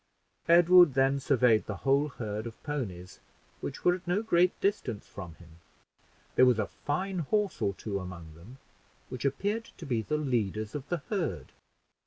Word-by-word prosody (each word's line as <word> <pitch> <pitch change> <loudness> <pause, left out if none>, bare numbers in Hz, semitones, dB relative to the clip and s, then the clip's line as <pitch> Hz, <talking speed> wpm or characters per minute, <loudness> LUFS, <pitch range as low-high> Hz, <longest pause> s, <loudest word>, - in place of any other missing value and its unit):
Edward 175 -3 +7
then 135 +1 +3
surveyed 125 -5 +3
the 105 - -3
whole 140 +2 +3
herd 110 -4 -5
of 115 - -11
ponies, 100 - -5 0.4
which - - -7
were 175 - +6
at 180 0 -7
no 190 +5 +1
great 180 -4 +2
distance 125 - -1
from 90 -5 -9
him. 85 0 -17 0.7
There 130 - +6
was 125 -3 +4
a 110 - 0
fine 185 - -3
horse 205 +5 -1
or 100 -1 0
two 100 -1 -4
among 90 -4 -9
them, 95 +12 -14 0.5
which 130 +1 -6
appeared 205 - -1
to 165 - -9
be 120 -6 0
the 150 +7 -2
leaders 110 -7 -1
of 145 -1 -6
the 175 -5 -2
herd. 165 - -2
135 Hz, 170 wpm, -29 LUFS, 105-170 Hz, 0.7 s, Edward